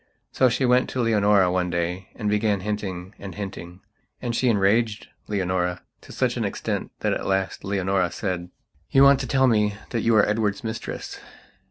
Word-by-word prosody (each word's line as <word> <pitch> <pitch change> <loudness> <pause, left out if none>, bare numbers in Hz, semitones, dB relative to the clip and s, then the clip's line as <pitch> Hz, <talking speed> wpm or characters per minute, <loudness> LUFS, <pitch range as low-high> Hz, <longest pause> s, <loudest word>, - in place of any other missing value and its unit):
So 130 - +3
she 125 +2 0
went 125 +1 +3
to 130 - -4
Leonora 105 -5 +3
one 90 -1 0
day 90 +2 -2
and 105 - -4
began 105 -1 +1
hinting 95 -2 -4
and 100 -1 -8
hinting. 95 -3 -7 0.4
And 120 -2 -3
she 130 - +1
enraged 110 +1 +1 0.2
Leonora 90 -3 -1 0.2
to - - -14
such - - 0
an - - -1
extent - - -3
that - - +1
at - - -3
last 95 0 -1
Leonora 95 -2 0
said: 90 -3 -3 0.4
"You 135 - +5
want 140 -1 +7
to 130 - -3
tell 130 +1 +3
me 105 -4 +2 0.2
that 115 - -1
you 115 +1 +3
are 105 - +5
Edward's 105 +2 0
mistress. 110 0 -5
105 Hz, 180 wpm, -24 LUFS, 95-115 Hz, 0.4 s, want